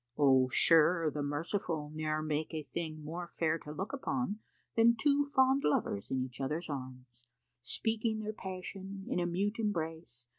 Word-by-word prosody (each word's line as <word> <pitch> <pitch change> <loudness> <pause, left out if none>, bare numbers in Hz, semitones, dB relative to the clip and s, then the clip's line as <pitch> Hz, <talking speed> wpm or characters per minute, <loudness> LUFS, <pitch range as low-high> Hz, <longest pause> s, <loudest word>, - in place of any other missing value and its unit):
Oh! 130 -3 +5
sure 165 +4 +5
the 150 - -3
merciful 150 +1 -2
Ne'er 155 0 -1
make 155 +1 -2
a 155 - -3
thing 155 -1 -5
more 170 +3 -5
fair 165 -1 0
to 150 - -9
look 190 - -4
upon, 255 -6 -2 0.4
Than 235 +1 +6
two 285 +4 +3
fond 265 -1 +3
lovers 100 -8 0
in 130 - 0
each 130 +1 -7
other's 150 +4 -2
arms, 130 -3 -8 0.3
Speaking 220 - 0
their 215 0 -3
passion 190 0 -6
in - - 0
a 175 - +1
mute 200 +6 -1
embrace. 160 - -3
165 Hz, 160 wpm, -33 LUFS, 150-205 Hz, 0.4 s, Than